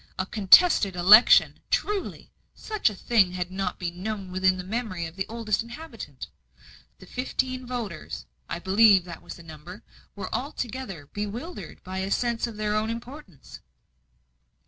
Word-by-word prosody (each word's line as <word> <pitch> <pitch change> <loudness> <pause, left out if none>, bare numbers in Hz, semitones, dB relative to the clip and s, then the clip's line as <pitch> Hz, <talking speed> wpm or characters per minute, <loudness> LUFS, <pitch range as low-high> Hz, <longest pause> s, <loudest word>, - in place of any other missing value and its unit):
A 185 - -1
contested 200 - +5
election! 200 +6 +7
truly, 415 -2 -2 0.2
such 430 - 0
a 210 - -8
thing 195 -3 +2
had 180 0 -4
not 190 -1 -3
been 175 0 -5
known 200 -2 -4
within 185 0 +2
the 185 - -5
memory 195 -4 -3
of 165 +1 -9
the 190 0 -3
oldest 225 -2 -1
inhabitant. 235 - -9 0.7
The - - -14
fifteen 255 +3 -3
voters 230 -10 -6 0.2
I - - -3
believe 195 +1 +5
that 170 -2 -9
was - - -9
the 170 - -13
number 165 +4 -11 0.3
were 200 - -6
altogether 240 - -5
bewildered 220 - -6
by 185 +1 -5
a 190 +1 -2
sense 235 +2 0
of 225 -2 -9
their 210 0 -1
own 215 +1 0
importance. 235 - -9
205 Hz, 150 wpm, -26 LUFS, 185-235 Hz, 0.7 s, election